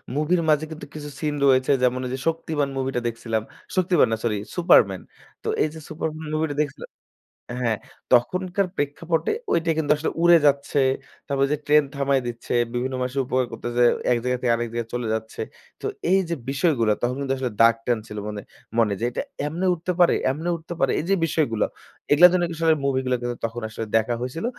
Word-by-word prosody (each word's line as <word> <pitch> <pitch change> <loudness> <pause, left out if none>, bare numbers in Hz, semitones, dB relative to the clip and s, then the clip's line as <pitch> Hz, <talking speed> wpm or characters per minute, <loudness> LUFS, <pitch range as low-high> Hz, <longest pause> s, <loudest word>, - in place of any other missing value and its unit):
মুভির 170 +4 +2
মাঝে 155 +1 +3
কিন্তু 155 - -7
কিছু 150 -1 -7
scene 150 -2 -1
রয়েছে, 130 0 +4
যেমন 125 0 +2
ঐ - - -2
যে - - -2
শক্তিমান 160 -3 -1
মুভিটা 130 -2 -1
দেখছিলাম। 115 -1 -2 0.3
শক্তিমান 185 -1 +4
না 110 - +1
সরি, 110 -3 0 0.2
সুপারম্যান। 100 - +4 0.4
তো - - -6 0.2
এই - - +2
যে 160 - -9
সুপারম্যান 155 0 -4
মুভি 155 +1 +1
টা - - -4
দেখছিলাম। 145 - -5 0.7
হ্যাঁ, 115 -3 +1 0.4
তখনকার 185 +10 +2
প্রেক্ষাপটে 160 +3 -1 0.2
ঐটা 165 0 +2
কিন্তু 150 -2 +1
আসলে 150 - -2
উড়ে 175 0 +7
যাচ্ছে, 140 0 +2 0.5
তারপর 140 -1 +2
যে 150 - +1
ট্রেন 150 0 +5
থামায় 140 -1 +1
দিচ্ছে, 120 0 -5 0.2
বিভিন্ন 130 +2 -2
মানুষের 130 +2 -1
উপকার 130 0 +1
করতেছে, 120 0 -1 0.3
এক 120 - +4
জায়গা 125 0 0
থেকে 120 -2 +3
আরেক 120 0 -2
জায়গায় 120 -1 -3
চলে 120 -2 -2
যাচ্ছে। 110 0 -4 0.4
তো - - -6 0.3
এই 195 - +5
যে 170 - 0
বিষয়গুলো 135 -6 +2
তখন 125 +1 0
কিন্তু 135 -1 0
আসলে 125 -3 -2
দাগ 115 0 +7
টান 120 -2 +1
ছিল 105 - -8
মানে 105 -1 -5 0.4
মনে, 110 -3 +3
যে - - -5
এইটা - - -3 0.3
এমনে 175 +5 -1
উঠতে 175 +2 -3
পারে! 175 - +6 0.2
এমনে 160 +5 -3
উঠতে 165 +2 -8
পারে! 135 - +2
এই 155 - -3
যে 195 - +4
বিষয়গুলো, 145 -9 +1 0.5
এগুলার 175 +5 +9
জন্য 180 -1 +2
আসলে 160 -1 +3
মুভি 135 -1 +2
গুলো 130 0 +1
কিন্তু 120 0 -3
তখন 115 +1 -4
আসলে 110 0 -5
দেখা 110 +2 0
হয়েছিল। 130 - -4
140 Hz, 195 wpm, -24 LUFS, 120-160 Hz, 0.7 s, এগুলার